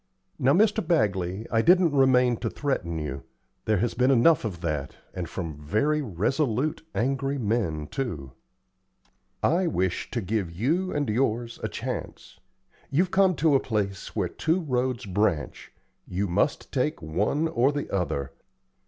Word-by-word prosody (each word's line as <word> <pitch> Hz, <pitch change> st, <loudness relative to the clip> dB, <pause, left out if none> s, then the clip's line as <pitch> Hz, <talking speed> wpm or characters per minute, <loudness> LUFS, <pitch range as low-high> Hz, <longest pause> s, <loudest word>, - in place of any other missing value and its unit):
Now, 135 Hz, +2 st, +4 dB
Mr. 210 Hz, +4 st, +3 dB
Bagley, 100 Hz, -, 0 dB
I 115 Hz, -, +3 dB
didn't 175 Hz, +1 st, +5 dB
remain 125 Hz, -3 st, +4 dB
to -, -, -2 dB
threaten 90 Hz, -, -2 dB
you. 75 Hz, -3 st, -4 dB, 0.4 s
There 110 Hz, -1 st, +2 dB
has 115 Hz, +5 st, 0 dB
been 125 Hz, +2 st, +2 dB
enough 135 Hz, +5 st, +5 dB
of 95 Hz, -7 st, -4 dB
that, 75 Hz, -5 st, -3 dB, 0.2 s
and 90 Hz, -3 st, -5 dB
from 80 Hz, -5 st, -5 dB
very 145 Hz, -, +1 dB
resolute, 130 Hz, -, 0 dB
angry 135 Hz, +3 st, 0 dB
men, 105 Hz, -, -1 dB
too. 75 Hz, -, -4 dB, 1.1 s
I 175 Hz, +3 st, +3 dB
wish 95 Hz, -, -1 dB
to 120 Hz, -, -2 dB
give 100 Hz, -3 st, -2 dB
you 155 Hz, -, 0 dB
and 145 Hz, -2 st, -1 dB
yours 115 Hz, 0 st, -1 dB
a -, -, -2 dB
chance. -, -, -6 dB, 0.5 s
You've 175 Hz, +6 st, +1 dB
come 190 Hz, -2 st, +4 dB
to 155 Hz, -1 st, +3 dB
a 135 Hz, -, +5 dB
place 100 Hz, -5 st, -3 dB
where 100 Hz, -5 st, +1 dB
two 160 Hz, -, 0 dB
roads 125 Hz, -5 st, -1 dB
branch; 95 Hz, -7 st, -1 dB, 0.4 s
you 95 Hz, +3 st, -1 dB
must 100 Hz, -, 0 dB
take 150 Hz, +4 st, -1 dB
one 100 Hz, -, 0 dB
or 140 Hz, -4 st, +2 dB
the 145 Hz, -1 st, -3 dB
other. 70 Hz, -8 st, -1 dB
120 Hz, 150 wpm, -26 LUFS, 95-145 Hz, 1.1 s, didn't